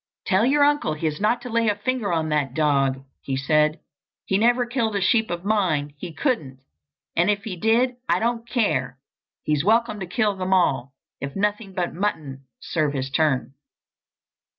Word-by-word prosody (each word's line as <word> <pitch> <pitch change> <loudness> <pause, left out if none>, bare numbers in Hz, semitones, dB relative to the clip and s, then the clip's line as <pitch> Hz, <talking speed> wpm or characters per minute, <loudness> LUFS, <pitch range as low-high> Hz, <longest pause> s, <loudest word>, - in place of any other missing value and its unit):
"Tell 195 +5 +3
your 285 +2 +4
uncle 290 - +2
he 155 - -5
is 155 +3 -2
not 225 +3 +1
to 250 - -6
lay 230 0 +2
a 205 - +1
finger 215 -1 -2
on 160 -2 0
that 145 -3 -1
dog!" 135 -4 +1 0.2
he 135 -1 -3
said. 150 +3 +2 0.5
"He 190 - +1
never 240 +2 +3
killed 235 -3 -1
a - - +1
sheep 220 +3 +2
of 175 +2 -4
mine—he 165 -6 -1
couldn't! 145 - -2 0.5
And 175 +4 +3
if 205 -1 0
he 215 -5 -5
did 235 +6 +2
I - - +4
don't 235 0 -2
care! 170 - 0 0.5
He's 150 -1 0
welcome 220 +1 +2
to 185 - -5
kill 205 +2 0
them 190 0 +1
all, 135 -7 +1 0.2
if 140 0 -6
nothing 205 -1 -1
but 180 -2 -2
mutton'll 160 -8 -3 0.2
serve 150 -3 -1
his 135 -1 -3
turn." 135 -3 +1
185 Hz, 175 wpm, -23 LUFS, 150-225 Hz, 0.5 s, your